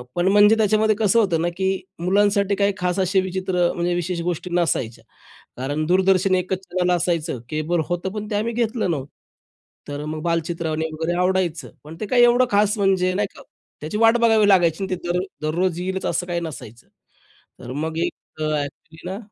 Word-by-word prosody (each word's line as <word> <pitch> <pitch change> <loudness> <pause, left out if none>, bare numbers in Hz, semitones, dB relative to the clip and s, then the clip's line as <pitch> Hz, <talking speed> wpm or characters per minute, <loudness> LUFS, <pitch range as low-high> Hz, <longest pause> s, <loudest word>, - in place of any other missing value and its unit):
पण 175 +2 +1
म्हणजे 205 +2 +6
त्याच्यामध्ये 215 0 +3
कसं 220 +1 +3
होतं 180 -7 +1
ना, 170 - +1
की 190 0 +1 0.3
मुलांसाठी 200 +2 +2
काही 200 0 +1
खास 180 0 -1
असे 190 +1 +2
विचित्र 185 0 -3
अ, - - -1
म्हणजे 175 0 -1
विशेष 175 0 -2
गोष्टी 175 +1 -3
नसायच्या. 145 -9 -1 0.5
कारण 145 +4 -2
दूरदर्शन 185 +1 +3
एकच 185 0 -1
चॅनल 180 0 -1
असायचं, 165 -6 -1
केबल 155 +3 -1
होतं 175 +2 -2
पण 210 0 -5
ते 210 - -2
आम्ही 225 +3 -1
घेतलं 225 -4 0
नव्हतं. 140 -3 -3 0.8
तर 145 +1 -5
मग 155 0 -5
बालचित्रवाणी 165 -1 -1
वगैरे 160 +2 -2
आवडायचं 180 -3 0 0.2
पण 160 +2 -10
ते 215 - -3
काय 245 +3 +3
एवढं 240 +1 +5
खास 210 +1 +2
म्हणजे, 190 -2 +2
नाही 205 - 0
का, - - -13 0.4
त्याची 155 +7 -4
वाट 225 +1 +5
बघावी 220 -3 +4
लागायची 175 -1 +3
आणि 190 - -2
ते - - -4
दर 180 - +1 0.2
दररोज 170 +3 0
येईलच 190 +1 -3
असं 175 +2 -1
काही 175 -1 -2
नसायचं. 120 -8 -9 0.7
तर - - -7
मग 160 0 -3
एक - - -1 0.3
अ, - - 0
ॲक्च्युअली 155 +4 -7
ना, 195 - -4
180 Hz, 185 wpm, -22 LUFS, 165-200 Hz, 0.8 s, म्हणजे